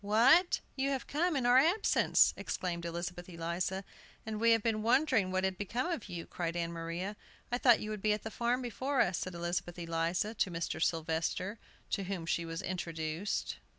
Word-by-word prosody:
"What! 255 - +5
you 270 +1 0
have 270 -3 -2
come 330 +3 0
in 260 -3 0
our 245 +1 +7
absence!" 345 +9 +4
exclaimed 170 -2 -3
Elizabeth 175 +1 -5
Eliza. 175 +3 -2 0.4
"And 220 -1 -4
we 230 +1 +4
have 225 -2 +4
been 220 -2 +1
wondering 235 -3 +3
what 185 0 0
had 190 -1 -1
become 230 +6 -1
of 235 -11 -4
you!" 170 -2 -5
cried 170 -1 -3
Ann 170 -1 -1
Maria. 170 +5 -4 0.4
"I 245 - 0
thought 240 -4 +6
you 215 - -4
would 210 -2 -5
be 215 - +2
at 210 - -4
the 220 - -5
farm 245 +3 0
before 260 +4 -2
us," 180 -5 +1
said 185 -1 -5
Elizabeth 175 0 -3
Eliza 170 +5 -1
to 200 - 0
Mr. 165 -2 -3
Sylvester, 165 +5 -1 0.3
to 195 - -1
whom 185 -3 -4
she 170 0 0
was 165 0 -5
introduced. 165 0 -3
190 Hz, 190 wpm, -33 LUFS, 170-235 Hz, 0.4 s, our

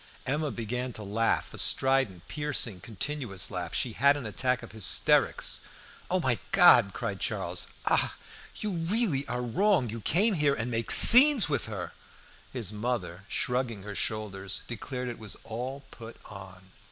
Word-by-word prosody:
Emma 150 +3 -2
began 125 +1 -5
to 110 - -9
laugh, 110 +3 -2
a - - -5
strident, 130 -10 0
piercing, 140 - -2
continuous 120 -3 -4
laugh; 90 -2 -5
she 120 - -1
had 140 +5 +2
an 140 - -8
attack 125 +4 -2
of 120 - -11
hysterics. 110 -5 +1 0.5
"Oh, - - 0
my - - -1
God!" - - +6
cried - - -6
Charles. - - -4 0.2
"Ah! - - 0 0.4
you 210 - -4
really 170 - -2
are 125 -1 -4
wrong! 130 - 0
You 115 0 -7
come 205 - +1
here 145 -5 0
and 120 +2 -5
make 115 -1 -3
scenes 255 - +9
with 140 - -2
her!" 95 -6 -7 0.6
His 115 -6 -5
mother, 105 -5 -5
shrugging 125 -5 -2
her 105 0 -8
shoulders, 100 -2 -3
declared 125 +2 -7
it 120 - -7
was 110 -2 -7
"all 125 +5 -7
put 115 -1 -12
on." 95 -2 -13
120 Hz, 155 wpm, -27 LUFS, 105-140 Hz, 0.6 s, scenes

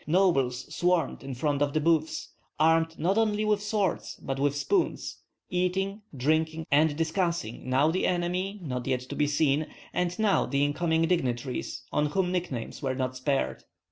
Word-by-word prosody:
Nobles 140 -8 +2
swarmed 180 -1 +1
in 135 -1 -6
front 145 +2 0
of 145 -1 +1
the 155 - +2
booths, 160 0 +1 0.3
armed 165 +1 +3
not 190 +7 +2
only 215 -1 +1
with 210 -1 +2
swords 205 -3 -1
but 135 0 -4
with 145 0 +1
spoons, 370 - 0 0.3
eating, 190 +3 0 0.2
drinking, 160 +4 +1
and 150 +1 +4
discussing, 165 - -1
now 140 +5 +4
the 185 - +1
enemy 180 +3 -1
not 125 -4 -4
yet 130 -2 +1
to 125 - -7
be 150 - +2
seen, 150 0 +2 0.3
and 180 0 -1
now 215 -3 +2
the 140 0 +2
incoming 160 +2 +1
dignitaries, 130 -7 -1
on 150 0 +2
whom 180 +3 0
nicknames 170 -11 -3
were 130 -2 -1
not 130 -1 -2
spared. 135 +2 -1
160 Hz, 165 wpm, -28 LUFS, 140-180 Hz, 0.3 s, and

